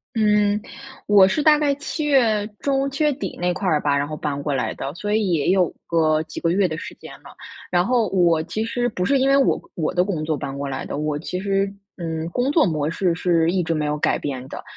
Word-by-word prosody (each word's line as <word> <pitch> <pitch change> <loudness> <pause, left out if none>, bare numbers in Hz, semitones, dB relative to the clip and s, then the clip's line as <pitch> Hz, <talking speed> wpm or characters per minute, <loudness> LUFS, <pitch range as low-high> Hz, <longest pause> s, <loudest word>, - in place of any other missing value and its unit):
嗯， 210 -1 +2 0.5
我 200 -2 +7
是 295 +10 0
大 300 -1 +6
概 290 -2 +1
7 305 +1 -4
月 230 -8 +3
中、 275 0 0
7 275 +3 -3
月 300 - +4
底 290 - -6
那 180 - +1
块 195 - -4
儿 155 -4 +2
吧， 145 -1 +1
然 140 +1 0
后 155 - -6
搬 145 -1 -3
过 145 - -2
来 130 - -1
的， 135 +1 -5
所 205 +4 -2
以 205 -5 +1
也 155 -1 +1
有 185 -1 +2
个 155 -2 +2
几 - - -8
个 165 - 0
月 185 +1 +2
的 155 - -4
时 - - -8
间 - - -12
了。 - - -13 0.4
然 175 +1 +2
后 240 -5 +2
我 170 -4 +3
其 215 +6 -4
实 245 +1 -1
不 180 -3 -2
是 275 +3 +3
因 265 - +2
为 275 - +4
我 275 -1 +3 0.2
我 155 -3 -2
的 180 0 +3
工 175 -6 -3
作 155 -1 -1
搬 140 -1 -5
过 140 0 -4
来 135 - -4
的， - - -5
我 150 -1 -1
其 180 +3 -5
实 195 0 +1 0.3
嗯， 165 -2 -4
工 250 +10 -1
作 315 -7 +4
模 155 -2 -1
式 175 -1 0
是 170 -2 +2
一 180 0 0
直 165 - -2
没 155 -2 -1
有 150 0 -1
改 - - +1
变 130 -3 -5
的。 - - -7
180 Hz, 265 characters per minute, -22 LUFS, 155-220 Hz, 0.5 s, 我